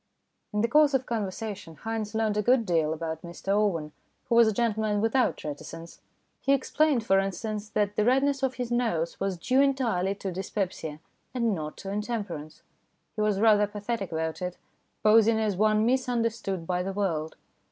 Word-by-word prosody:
In 210 - 0
the 230 - +2
course 295 +2 +4
of 260 -1 0
conversation 205 -5 -4
Haynes 220 -1 -3
learned 220 -1 +1
a 210 - +2
good 245 +2 +3
deal 165 -4 +1
about 160 0 -4
Mr 175 +2 -9
Owen, 195 -7 +1 0.4
who 245 - 0
was 235 -1 +7
a - - +3
gentleman 215 -1 0
without 225 +4 +1
reticence. 165 +3 -8 0.4
He 275 - +3
explained, 275 -2 +2
for 195 -3 +4
instance, 210 +2 -3
that 205 -1 0
the 210 - +2
redness 270 +3 +2
of 265 -1 0
his 245 -1 -4
nose 200 -9 0
was 195 -2 -1
due 255 +10 +2
entirely 235 -9 +1
to 195 -1 -5
dyspepsia, 180 -4 -4 0.4
and 235 -3 +1
not 155 -4 -5
to 195 - -6
intemperance. 205 -8 -4 0.5
He 215 - -2
was 210 -2 +1
rather 210 -1 +5
pathetic 205 -1 -4
about 160 +1 -3
it, 180 0 -4 0.5
posing 220 +1 +5
as 215 -3 0
one 215 +2 +3
misunder 245 -2 +1
stood 195 -6 -5
by 180 +1 0
the 195 +1 -3
world. 165 -6 -2
210 Hz, 175 wpm, -27 LUFS, 185-230 Hz, 0.5 s, was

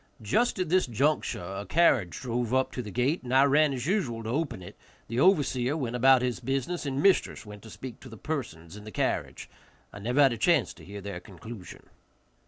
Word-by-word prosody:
Just 230 - +1
at 185 -3 -2
this 185 -2 +3
juncture 135 -3 0
a 95 +3 -5
carriage 115 - +2
drove 120 -1 -1
up 130 0 +1
to 125 - -4
the 105 - -8
gate, 125 - 0
and 125 - -7
I 130 +1 +6
ran 145 +1 +4
as 130 -2 -4
usual 140 - -1
to 110 - -5
open 140 - -2
it, - - -11 0.3
the 115 +2 -2
overseer 140 -5 +3
went 125 -5 -3
about 130 +1 +5
his 125 -1 -1
business, 135 +6 -2
and 140 +1 -2
mistress 195 - +2
went 105 -1 -10
to 110 - -12
speak 125 +1 -9
to 130 - -12
the 110 - -11
persons 100 - -5
in 105 - -10
the 110 - -9
carriage. 105 - -2 0.5
I 100 - -8
never 125 +7 +2
had 135 -3 +4
a - - -5
chance 110 - +2
to - - -16
hear 100 +1 -8
their 100 -2 -6
conclusion. 110 +1 -11
125 Hz, 215 wpm, -28 LUFS, 110-140 Hz, 0.5 s, I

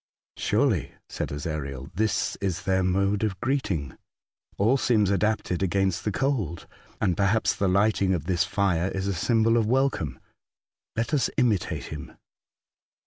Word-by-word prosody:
'' - - -71
Sm^ely," - - +1
said - - -4
Ezariel, 70 -2 -5
" - - -38
this 105 -1 0
is 95 -3 -2
their 95 -1 +2
mode 100 +3 +1
of 100 -4 -1
greeting. 100 - -1 0.6
All 110 +6 +3
seems 110 -7 +2
adapted 100 -3 0
against 95 +1 0
cold, 110 - -1 0.3
and 90 -4 +1
perhaps 100 +4 +2
the 100 - 0
lighting 100 0 +2
of 80 - -3
this 90 0 +2
fire 95 -2 +1
is 95 0 -3
a 100 - 0
symbol 115 +5 +2
of 110 -2 +2
welcome. 125 - 0 0.8
Let 115 +7 -1
us 145 - +2
imitate 110 -8 +1
him." - - -9
100 Hz, 145 wpm, -26 LUFS, 90-110 Hz, 0.8 s, All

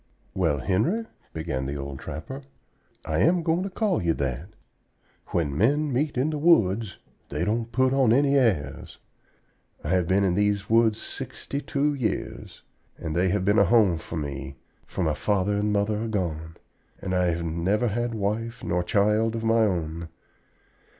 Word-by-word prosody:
"Well, 85 -6 +1
Henry," 140 - +1 0.3
began 75 -5 -3
the 70 - -3
old 70 -1 -6
trapper, 130 - -7 0.6
"I 80 0 -1
am 170 - +3
going 165 +2 +1
to 195 - -3
call 200 0 0
you 85 -2 +1
that. 70 +6 -3 0.8
When 75 -5 -1
men 140 - +2
meet 145 +2 0
in 140 +5 +1
the 150 - -3
woods 110 - +3 0.3
they 75 +5 -1
don't 115 +3 -1
put 130 +2 +2
on 135 -4 +4
any 140 +3 +4
airs. 95 - 0 0.9
I 75 - -4
have 90 -1 +2
been 95 +2 +3
in 95 -2 +2
these 100 +1 0
woods 115 -1 +4
sixty 140 - -5
two 145 +1 0
years, 120 -8 -4 0.3
and 80 -1 -4
they 90 +2 +2
have 95 0 0
been 105 +3 +4
a - - +6
home 105 -8 +4
for 80 - -8
me, 70 -2 -5 0.3
for 95 - -3
my 80 -2 +1
father 100 +3 0
and 105 +1 0
mother 105 +2 0
are - - -3
gone, 85 -6 -3 0.4
and 95 - -4
I 90 -1 +2
have 85 0 -1
never 90 +8 0
had 120 +2 -2
wife 115 +3 -2
nor 90 - 0
child 105 +4 +2
of 115 - -3
my 115 +1 +3
own. 85 -3 -3
100 Hz, 170 wpm, -26 LUFS, 85-120 Hz, 0.9 s, a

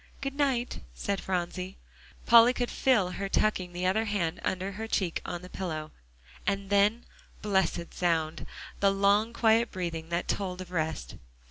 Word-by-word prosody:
"Good 275 -1 -3
night," 270 -4 0 0.2
said 200 - -2
Phronsie. 185 0 -3 0.5
Polly 235 +1 +8
could 245 -1 -2
feel 210 -9 +2
her 195 +1 -4
tucking 190 -4 +1
the 180 +1 -3
other 215 +5 +2
hand 180 -5 -1
under 190 +1 -1
her 220 +3 -5
cheek 185 -6 -1
on 175 0 -5
the - - -8
pillow, 155 -5 -4 0.6
and 200 -1 -1
then, 205 +4 +3 0.4
blessed 190 -4 0
sound 165 -3 0 0.3
the 200 - +4
long 200 +3 +3
quiet 230 0 +3
breathing 165 -3 -4
that 170 +1 -1
told 185 -2 -2
of 185 -1 -8
rest. 160 - -3
195 Hz, 155 wpm, -29 LUFS, 175-215 Hz, 0.6 s, Polly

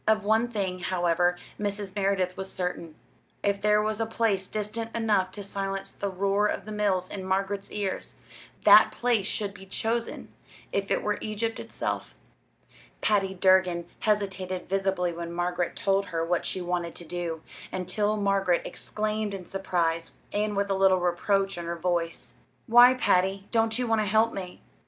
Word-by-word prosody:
Of 215 -1 +3
one 220 +3 +3
thing, 195 -6 -2
however, 175 -1 +1 0.2
Mrs. 205 -1 -3
Merideth 195 -2 +1
was 190 0 -5
certain 180 -3 -4 0.5
if 200 0 +1
there 210 0 +4
was 215 0 -1
a 225 - 0
place 215 -4 0
distant 215 +2 -4
enough 210 -5 +2
to 205 - -6
silence 195 0 -4
the 200 - -3
roar 200 +2 +1
of - - -3
the 215 - -7
mills 200 -3 +1
in 190 0 -6
Margaret's 195 +1 -1
ears, 200 -2 -3 0.5
that - - +8
place 235 -5 +1
should 205 -2 -2
be 195 - -12
chosen 230 +4 -2 0.4
if 200 0 -1
it - - +1
were 210 0 0
Egypt 220 +1 -2
itself. - - -4 0.9
Patty 195 -2 +2
Durgin 185 -2 +3
hesitated 190 -3 -1
visibly 190 -2 0
when 170 0 -5
Margaret 175 0 -1
told 195 0 +1
her 165 0 -1
what 175 0 0
she 185 - -3
wanted 175 -1 -2
to 170 - -9
do, 165 -1 -4 0.3
until 205 +4 -1
Margaret 195 -3 +2
exclaimed 215 -1 -3
in 185 -2 -8
surprise, 170 -4 -1 0.2
and 210 0 0
with 200 0 0
a - - +2
little 190 -1 +4
reproach 195 +2 +1
in 170 - -5
her 170 0 -3
voice: 170 -1 -2 0.3
"Why, 245 +1 +8
Patty, 195 -4 +2
don't 225 -1 +2
you 250 - 0
want 225 -2 +2
to - - 0
help 220 +3 +3
me?" 185 -2 -7
195 Hz, 165 wpm, -27 LUFS, 180-210 Hz, 0.9 s, that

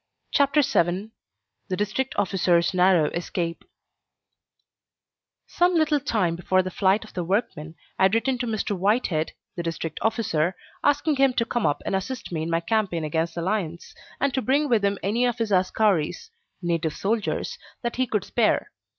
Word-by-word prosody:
CHAPTER 285 +1 +3
VII 185 0 0 0.6
THE 185 -2 -2
DISTRICT 230 +6 -1
OFFICER'S 180 -3 +2
NARROW 180 -4 +4
ESCAPE 170 -1 -3 1.8
Some 355 0 +2
little 310 -2 +3
time 215 - 0
before 185 +2 +1
the 185 - -5
flight 195 +3 +2
of 220 - -14
the 180 - -2
workmen, 170 -5 -2 0.2
I - - +6
had 190 +3 +3
written 250 +2 +1
to 245 - -2
Mr. 215 -2 -1
Whitehead, 185 -5 0 0.2
the 175 - -3
District 165 -1 -4
Officer, 190 -7 0 0.3
asking 290 +1 +2
him 270 -1 +4
to 230 - +1
come 240 -1 0
up 145 - -1
and - - 0
assist 205 +3 -4
me 160 -2 -2
in 160 - -3
my 165 0 +1
campaign 180 -3 0
against 160 +2 -1
the 170 - -3
lions, 175 -4 -3 0.3
and 280 -1 +1
to 265 - 0
bring 280 +4 +2
with 230 -6 +2
him 200 0 +1
any 220 +5 +1
of 240 -1 -1
his 225 -3 -2
askaris 190 - +1 0.3
(native 165 -2 0
soldiers) 225 - -2 0.2
that 235 0 -3
he 255 0 +1
could 210 -4 -1
spare. 230 -3 +1
200 Hz, 170 wpm, -25 LUFS, 170-240 Hz, 1.8 s, I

